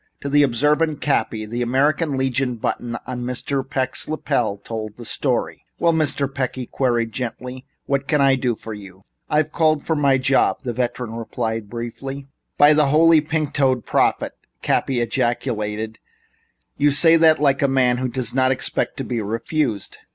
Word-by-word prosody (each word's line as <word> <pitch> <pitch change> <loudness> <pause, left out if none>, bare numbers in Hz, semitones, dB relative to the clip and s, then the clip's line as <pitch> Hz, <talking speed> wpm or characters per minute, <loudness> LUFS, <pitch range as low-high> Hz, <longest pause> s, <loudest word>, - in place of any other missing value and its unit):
To 140 - -4
the 145 +1 +4
observant 150 +4 +2
Cappy, 110 -6 -1
the 120 +3 -4
American 140 +4 +1
Legion 130 -1 0
button 120 +1 -3
in 125 -1 -4
Mr. 125 +2 -2
Peck's 130 0 -2
lapel 145 -9 -1
told 110 0 -7
the 120 - -9
story. - - -1
"Well, 170 -1 +2
Mr. 145 -3 +1
Peck," 130 -3 -2
he 130 -1 -5
queried 120 -3 -1
gently, 125 +2 -6 0.2
"what 140 0 -1
can 150 -2 +2
I 135 -1 +5
do 125 -3 0
for 110 +1 -8
you?" 95 -2 -12 0.3
"I've 155 0 +1
called 155 -3 +1
for 160 - 0
my 140 -3 +3
job," 130 +1 +2
the 120 - -4
veteran 120 -1 -3
replied 115 -2 -4
briefly. 135 +4 -6 0.3
"By 145 +1 +7
the 150 -1 +3
Holy 160 +2 +5
Pink 155 -1 -2
toed 130 -4 +1
Prophet!" - - +1 0.3
Cappy 130 -3 0
ejaculated, 110 -2 -2 0.8
"you 145 +1 +3
say 165 +4 +6
that 160 -1 +5
like 140 -2 +2
a 140 - +3
man 130 -2 +2
who 130 +1 -1
doesn't 125 0 -1
expect 130 - -1
to - - -3
be 120 -2 -3
refused." 115 +1 -2
130 Hz, 165 wpm, -21 LUFS, 120-145 Hz, 0.8 s, By